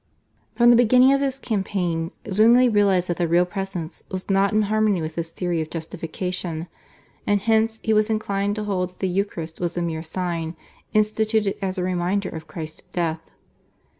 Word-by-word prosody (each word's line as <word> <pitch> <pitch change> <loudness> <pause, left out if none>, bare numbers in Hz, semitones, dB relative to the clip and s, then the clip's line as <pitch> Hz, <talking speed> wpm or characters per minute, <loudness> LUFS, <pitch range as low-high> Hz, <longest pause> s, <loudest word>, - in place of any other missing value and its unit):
From 240 0 +6
the - - +7
beginning 250 +3 +6
of 275 - +2
his 270 -1 -1
campaign 190 -8 -2 0.2
Zwingli 230 +5 +5
realised 200 -5 +3
that 175 - -1
the 175 - +1
Real 175 +2 +4
Presence 180 -3 -5
was 185 +1 -4
not 195 +1 +3
in 215 0 +3
harmony 215 -2 +2
with 160 0 -4
his 165 0 -4
theory 175 -1 -2
of 155 - -5
justification, 165 +1 -4 0.6
and 205 0 +3
hence 220 +1 +1
he 220 - +2
was 215 0 +3
inclined 205 -2 -1
to 215 - -3
hold 185 -3 -1
that 180 - -25
the 190 - 0
Eucharist 175 -4 -3
was 175 0 -2
a - - 0
mere 160 -2 -2
sign 170 -1 -3 0.4
instituted 215 -1 +1
as 190 0 -2
a 180 - -1
reminder 185 +2 0
of 160 -1 -8
Christ's 155 -2 -7
death. 165 -2 -2
190 Hz, 180 wpm, -23 LUFS, 170-215 Hz, 0.6 s, the